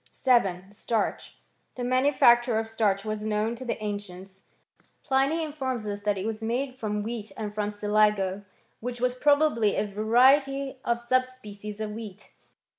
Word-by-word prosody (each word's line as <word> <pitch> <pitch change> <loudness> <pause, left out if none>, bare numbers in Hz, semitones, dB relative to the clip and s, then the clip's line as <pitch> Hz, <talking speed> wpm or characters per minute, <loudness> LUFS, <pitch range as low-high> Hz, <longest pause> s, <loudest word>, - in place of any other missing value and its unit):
VII. 195 -8 +3
— - - -21
STARCH. 220 +1 -3 0.4
The 250 - -4
manufacture 250 -2 +4
of 225 - 0
.starch 215 -3 0
was 215 0 -3
known 215 +1 0
to 235 - -8
the 240 - -3
an 205 -1 -2
cients. 190 0 -13 0.6
Pliny 280 +4 +1
informs 265 -7 -3
iis 205 -1 -4
that 205 -1 0
it 190 - -4
was 220 0 -3
made 250 +4 -2
from 210 -4 -3
wheat 220 -2 -5
and 210 -2 -4
from 210 -1 -1
siligo, 205 -2 +1 0.4
which 245 +1 -5
was 250 0 +1
probably 285 -5 +3
a 210 - 0
variety 265 +6 +3
or 235 0 +1
sub 255 +2 +2
species 210 -5 -10
of 215 -1 -3
wheat. 210 -2 -9
220 Hz, 165 wpm, -27 LUFS, 210-255 Hz, 0.6 s, manufacture